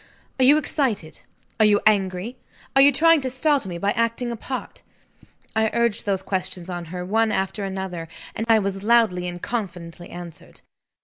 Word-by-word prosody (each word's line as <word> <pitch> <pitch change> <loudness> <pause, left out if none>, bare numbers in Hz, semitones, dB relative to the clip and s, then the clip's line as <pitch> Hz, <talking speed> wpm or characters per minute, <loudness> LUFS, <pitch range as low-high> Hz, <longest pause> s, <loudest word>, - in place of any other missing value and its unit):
"Are 260 - +5
you 290 +3 +7
excited? 255 - -1 0.4
are 215 - +6
you 205 -1 +4
angry? 195 +2 +1 0.4
are 270 - +7
you 280 +1 +8
trying 325 +2 +5
to 260 - -2
startle 265 -3 +1
me 175 - -5
by 200 +4 0
acting 230 +2 0
a - - -3
part?" 255 +3 -6 0.7
I 220 0 +2
urged 235 -3 0
those 190 -1 0
questions 185 -2 -3
on 175 -1 -5
her, 180 +2 -6
one 220 +3 +2
after 195 +1 -1
another; 190 -3 -5 0.3
and 225 - -3
I 225 - +7
was 195 -2 -2
loudly 215 -6 +3
and 175 0 -5
confidently 175 -6 -5
answered. 175 -2 -10
205 Hz, 175 wpm, -23 LUFS, 180-235 Hz, 0.7 s, you